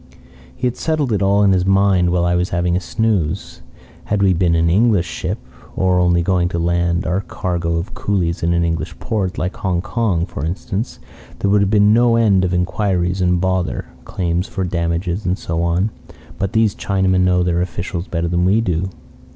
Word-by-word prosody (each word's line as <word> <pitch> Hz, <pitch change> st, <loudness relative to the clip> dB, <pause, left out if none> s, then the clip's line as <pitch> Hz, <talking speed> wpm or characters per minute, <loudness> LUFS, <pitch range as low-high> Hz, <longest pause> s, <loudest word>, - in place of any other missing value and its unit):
"He -, -, -4 dB
had 125 Hz, -, -1 dB
settled 155 Hz, -5 st, -1 dB
it 100 Hz, -, 0 dB
all 100 Hz, +1 st, +3 dB
in 100 Hz, -, +4 dB
his 90 Hz, -1 st, +2 dB
mind 95 Hz, -2 st, +3 dB
while 85 Hz, 0 st, +1 dB
I 85 Hz, -, +2 dB
was 90 Hz, +1 st, 0 dB
having 85 Hz, 0 st, 0 dB
a -, -, +2 dB
snooze. 95 Hz, -4 st, -2 dB, 0.4 s
Had 100 Hz, -1 st, 0 dB
we 95 Hz, -1 st, +4 dB
been 85 Hz, -1 st, +2 dB
an 85 Hz, 0 st, +2 dB
English 100 Hz, 0 st, +3 dB
ship, -, -, -4 dB, 0.4 s
or 95 Hz, -1 st, +2 dB
only 85 Hz, -1 st, +3 dB
going 90 Hz, -1 st, +1 dB
to 85 Hz, -, -3 dB
land 85 Hz, +2 st, 0 dB
our 90 Hz, +2 st, 0 dB
cargo 85 Hz, -3 st, -2 dB
of 85 Hz, +3 st, -4 dB
coolies 90 Hz, -4 st, -1 dB
in 85 Hz, -, +1 dB
an 85 Hz, 0 st, +2 dB
English 85 Hz, 0 st, -2 dB
port, 100 Hz, -6 st, -2 dB
like 90 Hz, +1 st, -3 dB
Hong 90 Hz, -3 st, -1 dB
Kong, 95 Hz, -4 st, -1 dB
for 75 Hz, -, -7 dB
instance, 95 Hz, +7 st, -3 dB, 0.4 s
there 100 Hz, -, 0 dB
would 105 Hz, 0 st, +4 dB
have 100 Hz, -, +2 dB
been 105 Hz, 0 st, +4 dB
no 120 Hz, 0 st, +4 dB
end 105 Hz, -5 st, +3 dB
of 90 Hz, -, 0 dB
inquiries 90 Hz, 0 st, 0 dB
and 90 Hz, -1 st, +2 dB
bother, 95 Hz, 0 st, -1 dB
claims 90 Hz, 0 st, -2 dB
for 95 Hz, -, -3 dB
damages 85 Hz, +2 st, -2 dB
and 90 Hz, +1 st, 0 dB
so 80 Hz, 0 st, -3 dB
on. 85 Hz, +5 st, 0 dB, 0.5 s
But 100 Hz, +2 st, -2 dB
these 110 Hz, -3 st, +3 dB
Chinamen 95 Hz, -2 st, +1 dB
know 90 Hz, -1 st, +3 dB
their 90 Hz, 0 st, +1 dB
officials 90 Hz, 0 st, -4 dB
better 85 Hz, 0 st, -2 dB
than 85 Hz, +1 st, 0 dB
we 95 Hz, +5 st, +3 dB
do. 95 Hz, -4 st, -1 dB
90 Hz, 200 wpm, -19 LUFS, 85-100 Hz, 0.5 s, in